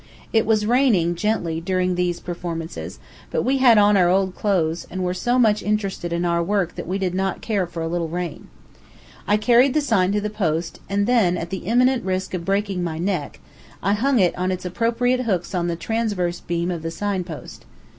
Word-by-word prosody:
It 225 -1 +3
was 215 -2 +2
raining, 220 -8 +3
gently, 170 -4 -1
during 185 +1 0
these 175 -1 -1
performances, 170 -1 -6 0.3
but - - -1
we 270 +1 +2
had 245 -4 +6
on 205 0 +5
our 180 -3 +4
old 190 0 +2
clothes, 175 -6 0
and 185 0 -4
were 180 0 0
so 240 +7 0
much 215 -4 +3
interested 200 -4 -2
in 170 +1 -1
our 170 0 +1
work 190 0 0
that - - -7
we 185 +2 -1
did 185 -2 -1
not 190 0 -1
care 200 -5 -1
for 165 -1 -5
a - - -2
little 170 0 -1
rain. 175 +1 -5 0.8
I 210 - +4
carried 245 +5 +4
the - - +5
sign 210 -10 +2
to 210 - +2
the 210 0 -3
post, 165 -5 -2
and 200 +1 +1
then, 215 -7 +3
at 170 0 -5
the 190 -2 -5
imminent 250 +2 +3
risk 185 0 -2
of 180 -2 -3
breaking 195 -2 0
my 160 -2 -3
neck, 175 -4 -2 0.4
I 200 +3 +2
hung 260 +5 +2
it 185 -5 +3
on 185 +1 -1
its 185 0 -4
appropriate 235 +6 +1
hooks 185 -4 -1
on 175 -1 0
the 170 - -1
transverse 185 -3 -2
beam 170 +1 -2
of 170 -2 -4
the 165 - -3
sign 195 +2 -2
post. 165 -4 -10
185 Hz, 210 wpm, -22 LUFS, 175-215 Hz, 0.8 s, had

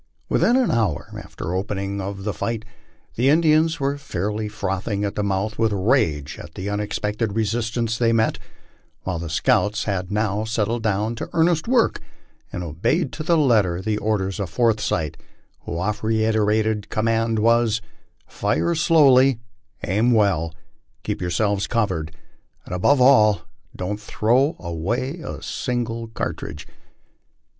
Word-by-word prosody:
Within 240 - +3
an 260 -2 +3
hour 110 -10 0
after - - -10
the - - -3
opening 100 +1 -2
of 95 0 -5
the 105 0 -2
fight, 115 -1 -3 0.5
the 125 +4 +2
Indians 160 +1 +3
were 140 +1 -1
fairly 105 - -3
frothing 100 +1 -2
at 100 - -2
the - - -2
mouth 100 +2 -1
with 110 -1 +2
rage 95 - +1
at - - -11
the 100 +2 -4
unexpected 105 +1 -2
resistance 115 +1 -1
they 115 -1 +3
met, 110 -1 +1 0.6
while 90 -3 -3
the 85 -1 -5
scouts 105 +6 +1
had 95 -2 -2
now 105 0 0
settled 110 +1 -1
down 110 +1 0
to 115 - -6
earnest 165 +1 +2
work, 245 -1 +2 0.5
and 90 - -4
obeyed 115 - -1
to 155 - -6
the 170 +1 +2
letter 105 - +3
the 105 +2 -1
orders 100 -2 -1
of 100 -4 -2
Forsyth, 105 - 0 0.4
whose 85 - -6
oft 105 +4 -2
reiterated 110 -1 +1
command 115 0 +1
was, 115 0 +3 0.3
" - - -41
Fire 170 - 0
slowly, 135 -6 +5 0.5
aim 110 +7 +2
well, 95 -7 +2 0.5
keep - - -3
yourselves 100 +3 0
covered, 95 -9 -1 0.5
and, - - -7
above 130 +10 +3
all, 110 -6 +5 0.3
don't 100 +3 -3
throw 125 +9 +1
away 100 - -3
a - - -7
single 115 -2 -3
cartridge." 90 -9 -5
110 Hz, 145 wpm, -22 LUFS, 100-120 Hz, 0.6 s, slowly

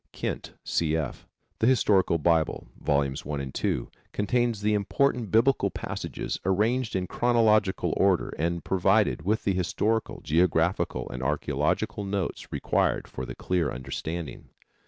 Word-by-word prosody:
Kent, - - -4
C. 80 -1 0
F., 75 -5 -5 0.3
The 110 - +3
Historical 105 -9 +3
Bible, 80 0 +1 0.2
Vols. 70 -1 0
I 75 - -5
and 65 -1 -5
II. - - 0 0.3
Contains 115 +1 +1
the 105 0 +2
important 115 +2 +1
Biblical 120 +5 +3
passages - - -4
arranged 110 +6 +1
in 95 -1 0
chronological 110 -3 +2
order 95 -3 +2
and 85 0 -1
provided 95 +1 +2
with 105 +7 0
the 100 - +1
historical, 105 +5 0
geographical 85 +2 +1
and 65 - -5
archaeological 65 +8 -1
notes 100 -2 -3
required - - 0
for 65 - -6
their - - -6
clear 90 -4 0
understanding. 70 +4 -5
95 Hz, 135 wpm, -27 LUFS, 80-110 Hz, 0.3 s, The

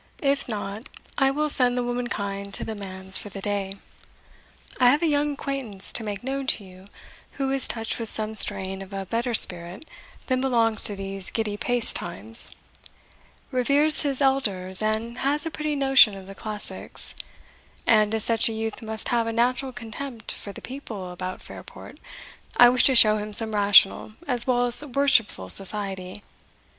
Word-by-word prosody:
If 275 0 0
not, 210 +3 -6 0.3
I 270 -1 +3
will 300 +3 -1
send 250 -4 +2
the 245 - -1
womankind 200 -5 -4
to - - -2
the 220 - -5
manse 190 -2 -2
for 205 - -9
the 200 - -9
day. 195 -1 -3 1.0
I 250 -1 +5
have 290 +6 +1
a - - +2
young 295 -1 0
acquaintance 260 -9 -2
to 230 - +2
make 205 0 -6
known 270 +1 -4
to 215 - 0
you, 185 0 -15 0.5
who 270 -1 -3
is 270 -1 +4
touched 225 0 -3
with 225 -2 -4
some 215 0 0
strain 195 -3 +3
of 195 +1 -11
a 195 0 -5
better 230 +4 -2
spirit 180 - +2 0.4
than 255 -1 -1
belongs 230 -4 0
to 205 - -2
these 195 -1 -6
giddy 220 -2 -3
paced 245 +2 0
times 225 +6 -1 1.0
reveres 285 +4 +4
his 280 -2 -2
elders, 200 -9 +1
and 220 +3 -2
has 290 +3 0
a 325 - -4
pretty 305 -1 -3
notion 270 -7 +4
of 190 - -12
the 195 - -11
classics 210 +1 -3 0.7
and, 215 -1 +3
as 220 - -1
such 230 0 +4
a - - -5
youth 220 0 -5
must 220 -1 -2
have 235 -1 0
a - - -2
natural 250 +3 -1
contempt 230 0 -7
for 200 - -8
the - - -12
people 220 -9 -8
about 185 +1 -7
Fairport, - - -12 0.6
I 245 - +8
wish 255 +1 +3
to 265 - +5
show 215 -2 +8
him 210 0 -6
some 220 0 +3
rational 205 0 +4
as 250 -3 +1
well 245 -1 +1
as 245 +4 +5
worshipful 250 - +1
society. 195 - 0
225 Hz, 175 wpm, -24 LUFS, 200-255 Hz, 1.0 s, I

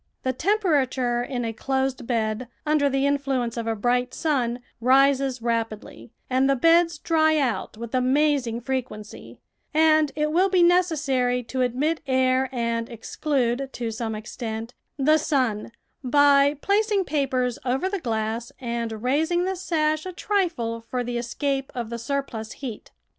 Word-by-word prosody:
The 260 - 0
temperature 275 - +1
in 245 -1 -3
a 225 - -3
closed 265 +1 -2
bed, 225 0 -1 0.2
under 300 -2 +3
the 270 0 +1
influence 275 -4 0
of 230 -1 -4
a 225 - 0
bright 245 +3 0
sun, 250 -6 0 0.2
rises 265 0 +3
rapidly 225 - -3 0.2
and 260 +1 +2
the 275 - +4
beds 335 +4 +4
dry 315 0 +2
out 250 -6 -1
with 235 +1 -7
amazing 255 -2 +1
frequency, 245 -5 -5 0.4
and 310 -2 +4
it 300 0 0
will 370 +4 +3
be 365 -2 +4
necessary 285 -9 +2
to 255 +2 -3
admit 270 +6 0
air 260 0 +2
and 230 -2 -2
exclude, 255 +2 -1
to 235 -2 -3
some 220 -1 -3
extent, 225 +1 -6 0.2
the 305 +3 +4
sun 255 -9 0 0.3
by 285 +2 +5
placing 410 -1 +2
papers 260 -5 0
over 265 +8 0
the 395 0 -2
glass 225 -3 -2
and 235 -3 -4
raising 320 +7 +1
the 380 0 -1
sash 310 -3 0
a - - -4
trifle 340 - -1
for 245 +2 -3
the 240 0 -3
escape 270 +3 -2
of 235 -2 -4
the 235 - -4
surplus 235 -3 -4
heat. 245 -6 -7
260 Hz, 150 wpm, -24 LUFS, 235-300 Hz, 0.4 s, by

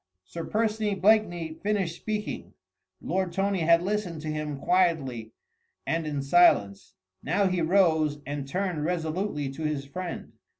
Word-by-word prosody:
Sir 165 - -6
Percy 215 -1 0
Blakeney 185 -5 +2
finished 195 -2 -1
speaking. 215 +1 -5 0.5
Lord 185 -2 -1
Tony 195 0 0
had 170 +1 +4
listened 190 -5 -2
to 155 - -5
him 150 -1 -3
quietly 135 -10 +1 0.5
and 165 -1 -1
in 145 -2 -2
silence: 135 - +3 0.3
now 190 +7 +1
he 185 -2 +1
rose 160 -4 +3
and 140 -1 -4
turned 180 -1 -2
resolutely 165 -1 -2
to 135 - -9
his 150 -2 -2
friend. 180 +5 -6
170 Hz, 135 wpm, -27 LUFS, 150-195 Hz, 0.5 s, had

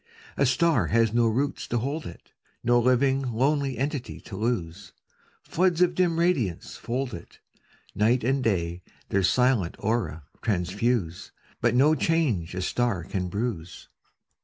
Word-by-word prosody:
A 140 - +2
star 165 +5 +2
has 115 -1 +2
do 115 0 +3
roots 135 +6 -1
to 120 - -1
hold 140 +7 -3
it, 85 - -13 0.3
No 120 0 +4
living 130 +2 +2
lonely 135 +2 0
entity 135 -1 -3
to 100 - -9
lose. 100 -4 -3 0.5
Floods 180 -1 +1
of 180 -1 +4
dim 175 -2 +1
radiance 150 - 0
fold 125 +2 -3
it; 85 - -10 0.6
Night 115 +4 +2
and 135 +2 +1
day 85 -5 -1 0.3
their 100 - +2
silent 120 -2 +2
aura 100 -8 -2 0.2
transfuse, 100 -2 -1 0.3
But - - +2
no 145 +5 +5
change 140 - 0
a 95 - -2
star 115 -3 0
oan 90 -1 -3
bruise. 100 -4 -4
120 Hz, 140 wpm, -26 LUFS, 95-135 Hz, 0.6 s, no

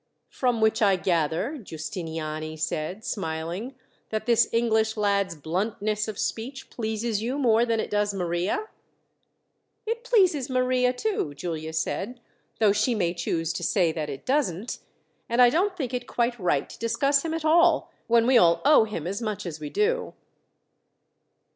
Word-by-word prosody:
"From 245 -3 0
which 220 +1 +2
I 200 -3 +5
gather," 175 - 0
Giustiniani 155 -3 -5
said, 155 +6 -3
smiling, 175 +7 -4 0.3
"that 215 0 -3
this 235 -1 +4
English 220 -1 +1
lad's 200 -4 +1
bluntness 205 +7 -2
of 215 -2 -5
speech 265 +4 -4
pleases 220 -1 -2
you 250 +5 -2
more 235 -3 +3
than 230 -1 +1
it - - -3
does 205 0 +1
Maria?" 185 - -1 1.2
"It 465 +2 -3
pleases 370 - +3
Maria, 255 -1 +2
too," 250 - -2
Giulia 160 0 -4
said, 200 +9 -3 0.4
"though 215 -3 +4
she 215 +4 +1
may 175 -5 0
choose 165 -1 -2
to 185 - -4
say 170 0 +2
that 155 -2 -4
it 135 -1 -7
doesn't. 245 - -1 0.5
And 235 +1 0
I 245 -1 +7
don't 370 +5 +1
think 260 -6 -3
it 250 0 -3
quite 240 0 -1
right 170 -7 +1
to - - -12
discuss 275 +4 +2
him 325 -1 -2
at 325 -1 -4
all, 335 0 +4 0.2
when 230 0 +4
we 250 -1 +6
all 170 -2 +4
owe 290 -6 +6
him 210 -8 -5
as 200 +5 -3
much 215 -4 -3
as 160 -3 -5
we 150 -1 -5
do." 475 - 0
220 Hz, 160 wpm, -26 LUFS, 170-250 Hz, 1.2 s, I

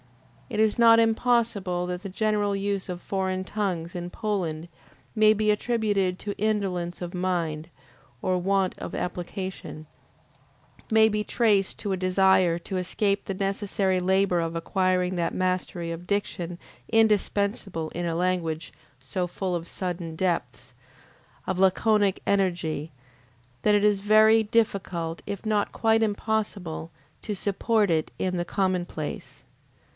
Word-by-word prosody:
It - - -3
is 220 +1 +3
not 230 -1 +7
impossible 225 -6 +1
that 180 0 -4
the 200 - -6
general 205 0 0
use 195 -1 -2
of 180 -1 -5
foreign 190 -1 -2
tongues 185 -5 -2
in 175 0 -4
Poland 175 -6 -3 0.5
may 215 0 +6
be 215 0 +2
attributed 210 -4 0
to 205 -1 -4
indolence 195 -5 -1
of 175 - -6
mind 170 -4 -2 0.5
or 185 0 +1
want 190 +1 +1
of - - -6
application; 180 -3 -5 1.0
may 220 -1 +6
be 210 -1 0
traced 210 -4 +2
to 205 - -3
a 190 - 0
desire 185 -2 +3
to 175 +2 -6
escape 200 +2 0
the 195 - -3
necessary 195 -1 0
labor 190 -1 +2
of 165 0 -2
acquiring 185 +1 0
that 170 -1 -1
mastery 185 -2 -1
of 170 +2 -7
diction 180 -4 -2 0.3
indispensable 205 -5 +1
in 175 +1 -3
a 165 -1 -1
language 170 -3 -1 0.3
so 175 +8 -2
full 180 +1 -3
of 170 0 -4
sudden 175 -3 -4
depths, 160 -10 -2 0.7
of 185 - -2
laconic 200 +1 +3
energy, 175 -6 0 0.7
that 210 - +4
it 205 - +2
is 205 -2 +3
very 215 +2 +6
difficult, 195 -7 -1
if 200 +1 -5
not 210 -1 +1
quite 225 0 +2
impossible, 205 -6 -2 0.3
to 210 - -4
support 205 +1 +1
in 160 -1 +2
it 185 - 0
the 175 -1 -1
commonplace. 180 -4 -3
190 Hz, 135 wpm, -26 LUFS, 175-210 Hz, 1.0 s, not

